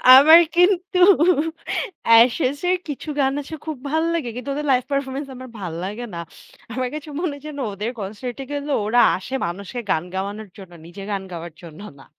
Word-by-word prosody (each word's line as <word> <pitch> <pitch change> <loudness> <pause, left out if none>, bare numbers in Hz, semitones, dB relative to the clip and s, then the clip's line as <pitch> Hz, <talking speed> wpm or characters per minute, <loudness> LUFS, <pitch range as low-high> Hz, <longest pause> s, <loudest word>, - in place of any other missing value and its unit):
আমার 315 +5 +9 0.2
কিন্তু 360 +1 +3 1.1
Ashes 250 +5 +5
এর 365 - +3
কিছু 295 +1 -6
গান 270 -1 +2
আছে 290 +3 -8
খুব 310 -3 -4
ভাল 315 +2 +1
লাগে। 295 -8 -2
কিন্তু 250 +2 -6
ওদের 295 +2 -3
লাইভ 255 -1 +3
পারফরম্যান্স 275 0 -2
আমার 255 0 -9
ভাল 180 -4 -5
লাগে 210 +6 -5
না। - - -4 0.5
আমার 255 +1 -2
কাছে 305 0 -7
মনে 310 -6 -2
যেন 305 -2 -7
ওদের 210 +4 -4
কনসার্টে 225 +6 -6
গেলেও, 285 0 -1
ওরা 240 +3 +4 0.2
আসে 190 +8 -9
মানুষকে 195 +7 -5
গান 160 - +1
গাওয়ানোর 200 +2 -4
জন্য, 190 -3 -12
নিজের 190 +4 -9
গান 195 -1 -2
গাওয়ার 170 -1 -7
জন্য 170 0 -11 0.2
না। 135 - -15
255 Hz, 175 wpm, -22 LUFS, 200-290 Hz, 1.1 s, আমার